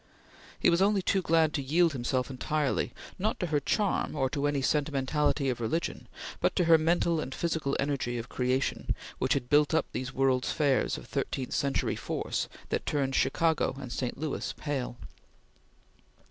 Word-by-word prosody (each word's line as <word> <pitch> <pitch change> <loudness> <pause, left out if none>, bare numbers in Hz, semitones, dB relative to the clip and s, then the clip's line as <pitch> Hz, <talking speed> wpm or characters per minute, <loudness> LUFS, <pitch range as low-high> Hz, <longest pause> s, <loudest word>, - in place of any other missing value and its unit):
He - - +4
was 170 +2 +3
only 200 -1 +3
too 195 - +2
glad 160 -3 +3
to 150 - -1
yield 160 +4 +3
himself 125 +1 -1
entirely, 145 +2 -1 0.3
not 215 +4 0
to - - 0
her 150 -3 +1
charm 195 +4 0
or 135 -3 0
to 145 -1 0
any 145 -2 0
sentimentality 145 0 +1
of 125 -2 -1
religion, 160 +9 -2 0.3
but - - +1
to 180 - +3
her 165 -1 +6
mental 165 +1 +2
and 135 -3 -4
physical 160 -5 -1
energy 135 -4 -1
of 115 +1 -5
creation 130 +1 -1 0.2
which 130 - +2
had 130 -3 -2
built 145 +3 +4
up 160 - +2
these 130 0 -4
World's 130 -1 +1
Fairs 140 -4 +1
of - - -10
thirteenth 130 -2 -3
century 140 -1 0
force - - -3 0.2
that - - -2
turned 135 -2 0
Chicago 160 +3 +2
and 130 -3 -7
St. 125 -1 -3
Louis 150 0 -3
pale. 135 -5 -3
145 Hz, 170 wpm, -29 LUFS, 130-160 Hz, 0.3 s, her